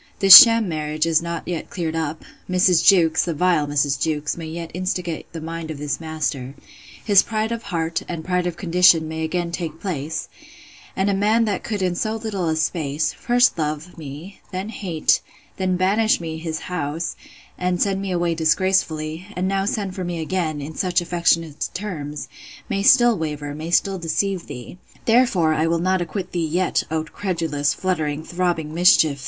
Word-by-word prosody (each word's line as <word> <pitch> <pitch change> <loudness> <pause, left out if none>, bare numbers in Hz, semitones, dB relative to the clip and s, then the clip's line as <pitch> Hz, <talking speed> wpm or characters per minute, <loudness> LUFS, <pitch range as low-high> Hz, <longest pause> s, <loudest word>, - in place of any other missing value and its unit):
This 195 -1 +10
sham 230 -2 +9
marriage 155 -1 -2
is 165 -1 +2
not 170 0 -5
yet 170 -3 -4
cleared 165 -3 -3
up: 160 -1 -3 0.2
Mrs. 180 -1 +3
Jewkes, 170 -5 +4
the 170 -2 -3
vile 170 -2 +2
Mrs. 145 -1 0
Jewkes! 150 -2 -1
may 165 -2 -7
yet 165 +1 -6
instigate 180 -2 -4
the 165 - -7
mind 165 0 -6
of 155 - -5
this 145 0 -3
master: 150 -4 -4 0.5
His 200 -3 +6
pride 220 +1 -2
of 230 -1 -3
heart, 165 -5 -2
and 165 -2 -5
pride 180 -1 0
of 175 -1 -4
condition, 175 -3 +4
may 160 0 -4
again 170 +1 -2
take 165 -2 -5
place: 160 -5 -4 0.7
And 190 +1 0
a 200 - +2
man 215 +4 +2
that 205 -3 -2
could 210 -4 -3
in 180 -1 0
so 215 +5 -2
little 205 -6 -3
a 160 - 0
space, 155 -2 -1
first 245 -5 +2
love 155 +3 -3
me, 155 +5 -10
then 190 +3 -4
hate, 175 -8 0 0.4
then 185 -1 0
banish 205 +4 +2
me 160 -2 -6
his 160 -1 -4
house, 165 -1 -4 0.4
and 180 -1 -1
send 195 -1 0
me 195 - -4
away 175 -2 0
disgracefully; 160 0 0
and 180 +1 -1
now 195 0 0
send 200 -2 -2
for 185 - -5
me 175 -1 -4
again, 160 -2 -2
in 150 +3 -7
such 180 +1 0
affectionate 165 -3 0
terms, 155 -7 -5 0.4
may 195 - -1
still 240 +2 +5
waver, 150 -4 -4
may 155 +3 -6
still 190 +2 +1
deceive 175 +2 -2
thee. 125 +9 -9 0.3
Therefore 225 -9 +3 0.2
will 170 - +1
I 165 - -3
not 185 0 +1
acquit 175 +2 -5
thee 170 -2 -1
yet, 180 +4 0
O 160 0 -1
credulous, 160 -4 -2
fluttering, 155 -5 -2
throbbing 170 -3 -2
mischief! 160 -5 +4
170 Hz, 180 wpm, -21 LUFS, 160-185 Hz, 0.7 s, This